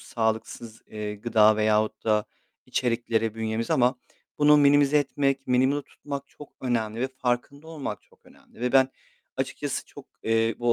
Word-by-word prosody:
sağlıksız, 110 0 -3
eee, 105 -1 -5
gıda 110 0 +4
veyahut 110 0 +1
da 105 -1 +2 0.4
içeriklere 115 -2 0
bünyemiz 110 0 -3
ama 125 +1 +3 0.4
bunu 150 0 +6
minimize 145 0 +5
etmek, 135 -1 0
minimumda 130 +3 +2
tutmak 140 0 -8
çok 150 - -14
önemli 115 -3 -1
ve 130 - 0
farkında 130 +3 -3
olmak 155 -4 -5
çok - - -28
önemli - - -20
ve 125 0 -1
ben 130 -1 +5 0.5
açıkçası - - -3
çok, - - -13 0.2
eee, 115 0 +1
bu 120 0 +2
120 Hz, 145 wpm, -26 LUFS, 110-135 Hz, 0.5 s, bunu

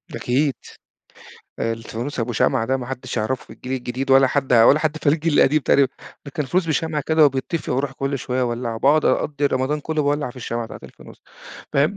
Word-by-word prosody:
أكيد، 135 +3 0 1.1
الفانوس 115 +4 -4
أبو 120 +1 -2
شمعة 115 +1 +1
ده 130 +2 +1
ما 125 -2 -6
حدش 130 -1 -5
هيعرفه 115 +4 -2
في - - -13
الجيل 130 - -7
الجديد 130 +1 -3
ولا 135 0 +6
حد 135 0 -1
ولا 120 +5 +6
حد 155 0 -1
فالجيل 155 +2 +1
القديم 155 +3 +4
تقريبًا، 140 -1 +3 0.4
ده 140 - -8
كان 150 - -2
فانوس 180 +6 0
بشمعه 160 -1 -1
كده 160 -1 +5
وبيتطفي 140 +4 -1
وأروح 135 +1 -1
كل 135 +1 -3
شوية 125 +1 -2
أولعه 120 -2 -2
باقعد 145 +5 +3
أقضي 145 -1 +1
رمضان 140 +3 -1
كله 155 +1 -1
باولع 145 -2 0
في 120 - -17
الشمعة 120 -1 -4
بتاعة - - -10
الفانوس - - -14 0.5
فاهم؟ 150 +8 +2
135 Hz, 190 wpm, -21 LUFS, 125-150 Hz, 1.1 s, ولا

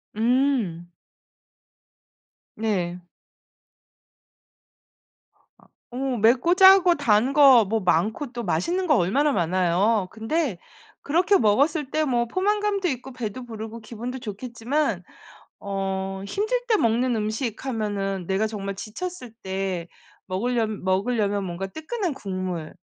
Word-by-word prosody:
음. 230 -8 +1 1.7
네. 185 -6 -1 2.9
어 245 - -9 0.2
맵고 250 - +3
짜고 380 -2 +7
단 245 -2 +2
거 275 -5 +7
뭐 220 +2 -1
많고 215 - 0
또 240 0 -4
맛있는 340 - -1
거 300 - +4
얼마나 275 +12 +2
많아요. 185 +3 +1
근데 225 - -2 0.4
그렇게 355 +6 +3
먹었을 275 - +2
때 310 - +1
뭐 240 -5 0
포만감도 400 - 0
있고 265 -1 -5
배도 245 +1 -5
부르고 225 0 -7
기분도 240 +3 -7
좋겠지만 235 - -2 0.6
어 195 -1 -3
힘들 435 - -1
때 445 -3 +3
먹는 235 - +1
음식 220 +3 -3
하면은 200 -6 -2
내가 195 +3 +1
정말 200 -2 -4
지쳤을 250 - -7
때 190 -3 -3 0.4
먹을려 230 +4 0
먹을려면 200 +1 0
뭔가 180 +1 -4
뜨끈한 325 - -4
국물 185 -8 -5
225 Hz, 220 characters per minute, -24 LUFS, 195-280 Hz, 2.9 s, 짜고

